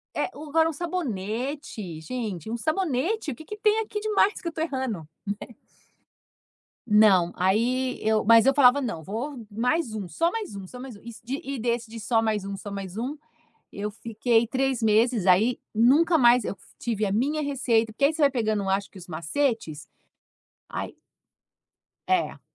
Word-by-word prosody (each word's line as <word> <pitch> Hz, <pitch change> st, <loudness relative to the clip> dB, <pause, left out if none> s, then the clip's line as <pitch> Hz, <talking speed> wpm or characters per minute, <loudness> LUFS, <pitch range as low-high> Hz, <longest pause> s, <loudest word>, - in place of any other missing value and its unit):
é -, -, +1 dB
agora 310 Hz, +2 st, +1 dB
um 325 Hz, -, -4 dB
sabonete, 245 Hz, -, -4 dB
gente, 220 Hz, -3 st, -5 dB
um 235 Hz, -, -2 dB
sabonete, 320 Hz, -, -1 dB
o -, -, -6 dB
que 315 Hz, -, -12 dB
que 420 Hz, -, -7 dB
tem 425 Hz, +1 st, +3 dB
aqui 425 Hz, -1 st, -4 dB
demais 420 Hz, -1 st, +2 dB
que 345 Hz, -, -6 dB
eu 335 Hz, -, -1 dB
estou 320 Hz, 0 st, -2 dB
errando?", 260 Hz, -, -3 dB, 0.3 s
né. 235 Hz, -, -10 dB, 1.3 s
Não, 205 Hz, -5 st, +5 dB
aí 245 Hz, +7 st, +1 dB
eu 220 Hz, -1 st, +1 dB
mas 230 Hz, +2 st, +7 dB
eu 270 Hz, -, +5 dB
falava: 280 Hz, 0 st, +6 dB
"Não, 195 Hz, -11 st, -4 dB
vou 235 Hz, -, -5 dB
mais 245 Hz, +4 st, 0 dB
um, 200 Hz, -4 st, -4 dB
só 335 Hz, -, 0 dB
mais 430 Hz, -, -5 dB
um, 195 Hz, -1 st, -7 dB
só 250 Hz, +6 st, -11 dB
mais 255 Hz, -4 st, -8 dB
um", -, -, -14 dB
e 235 Hz, -, -9 dB
de 265 Hz, +4 st, -3 dB
e 275 Hz, -2 st, -4 dB
desse, 235 Hz, 0 st, -1 dB
de 230 Hz, 0 st, -8 dB
só 225 Hz, +1 st, +1 dB
mais 215 Hz, -3 st, 0 dB
um, 195 Hz, 0 st, -5 dB
só 205 Hz, +1 st, -8 dB
mais 195 Hz, 0 st, -6 dB
um, 265 Hz, +6 st, -3 dB, 0.5 s
eu 205 Hz, +1 st, -4 dB
fiquei 230 Hz, +2 st, +1 dB
3 265 Hz, -1 st, 0 dB
meses, 220 Hz, -1 st, +3 dB
aí, 210 Hz, +7 st, +4 dB
nunca 290 Hz, +10 st, +4 dB
mais 245 Hz, -3 st, +5 dB
eu 200 Hz, -, -3 dB, 0.2 s
tive 220 Hz, -3 st, -1 dB
a 195 Hz, -, -1 dB
minha 280 Hz, +9 st, 0 dB
receita, 240 Hz, -6 st, +1 dB
porque 275 Hz, +6 st, +1 dB
aí 305 Hz, -, +3 dB
você 315 Hz, -, -4 dB
vai 285 Hz, -, +6 dB
pegando 215 Hz, -5 st, 0 dB
um 195 Hz, -, -2 dB
acho 195 Hz, +1 st, -1 dB
que -, -, -13 dB
os 180 Hz, -, -12 dB
macetes, 170 Hz, -, -2 dB, 0.8 s
ai -, -, -5 dB, 1.1 s
É. 370 Hz, -1 st, 0 dB
235 Hz, 185 wpm, -26 LUFS, 210-285 Hz, 1.3 s, mas